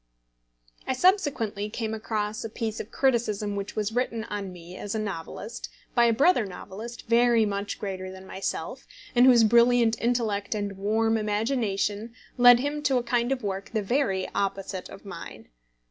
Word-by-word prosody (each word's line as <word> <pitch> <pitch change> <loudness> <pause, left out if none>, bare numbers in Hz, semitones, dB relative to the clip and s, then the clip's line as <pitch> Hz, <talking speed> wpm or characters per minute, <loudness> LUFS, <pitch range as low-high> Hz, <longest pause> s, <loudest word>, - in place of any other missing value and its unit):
I - - +1
subsequently 255 - +1
came 220 0 -3
across 215 -1 -3
a 225 - -4
piece 220 0 -4
of 215 - -6
criticism 215 -6 0
which 200 0 -5
was 215 0 -1
written 230 -1 -1
on 205 -3 -5
me 175 0 -11
as 205 +2 -5
a - - 0
novelist 210 +3 -6 0.2
by 240 - +5
a 235 - +4
brother 270 +3 +4
novelist 210 +4 -8
very 235 -1 +4
much 200 0 -3
greater 190 -2 -5
than 190 0 -11
myself, 190 0 -5 0.3
and 245 +1 +6
whose 240 -3 +7
brilliant 235 0 +4
intellect 225 -4 0
and 205 -1 -3
warm 220 +3 +1
imagination 215 0 -1 0.2
led 245 -1 +8
him 290 +2 -2
to 270 -3 +2
a 245 - 0
kind 240 +1 0
of 260 -3 -1
work 195 -1 -3
the 215 -2 0
very 195 -5 0
opposite 195 -1 -3
of 195 - -12
mine. 170 - -9
220 Hz, 165 wpm, -26 LUFS, 200-240 Hz, 0.3 s, led